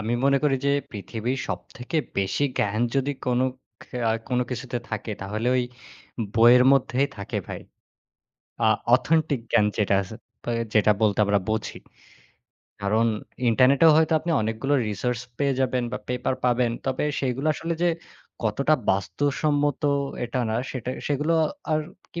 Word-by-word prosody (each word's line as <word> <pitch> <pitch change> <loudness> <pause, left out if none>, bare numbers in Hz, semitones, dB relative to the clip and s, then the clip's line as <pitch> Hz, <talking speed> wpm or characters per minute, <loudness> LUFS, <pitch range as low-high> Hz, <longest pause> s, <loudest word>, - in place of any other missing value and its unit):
আমি 115 +3 -1
মনে 140 0 +4
করি 140 -2 +3
যে 140 - +3 0.2
পৃথিবীর 115 +5 -4
সবথেকে 130 +5 -5 0.2
বেশি 100 +8 0
জ্ঞান 105 +2 0 0.2
যদি 140 +1 +1
কোন 125 0 +2 0.4
ক্যা 125 - -7
আ - - +3 0.2
কোন 125 -1 +1
কিছুতে 125 0 -3
থাকে 110 0 -4
তাহলে 110 +4 -3
ওই 125 - +2 0.7
বইয়ের 120 +2 +7
মধ্যেই 135 0 +2
থাকে 100 - -3
ভাই। - - -6 1.1
আ - - +5 0.3
অথেন্টিক 155 -2 +1
জ্ঞান 105 -3 +4
যেটা 100 -2 +2
আস 90 - -11 0.4
আ - - +1 0.2
যেটা 105 0 +5
বলতে 105 -2 +2
আমরা 100 0 +2
বুঝি। 110 0 -2 1.0
কারণ 110 +3 +2 0.4
ইন্টারনেটেও 135 +7 +5
হয়তো 160 0 +3
আপনি 170 - -3
অনেকগুলো 115 +6 -1
resource 120 +3 -2 0.2
পেয়ে 140 -2 +1
যাবেন 130 -1 +1
বা - - -2
পেপার 125 +1 -1
পাবেন। 125 -1 +2 0.2
তবে 130 +2 0 0.2
সেগুলো 135 +2 -1
আসলে 165 +3 -3
যে 175 - +4 0.6
কতটা 140 +8 +2 0.2
বাস্তবসম্মত 145 +8 0 0.4
এটা 125 +1 -2
না 110 - 0
সেটা 125 -1 -4 0.2
সেগুলো 150 +3 +1 0.4
আর 155 - +2 0.3
কি 170 - -5
125 Hz, 145 wpm, -25 LUFS, 110-140 Hz, 1.1 s, বইয়ের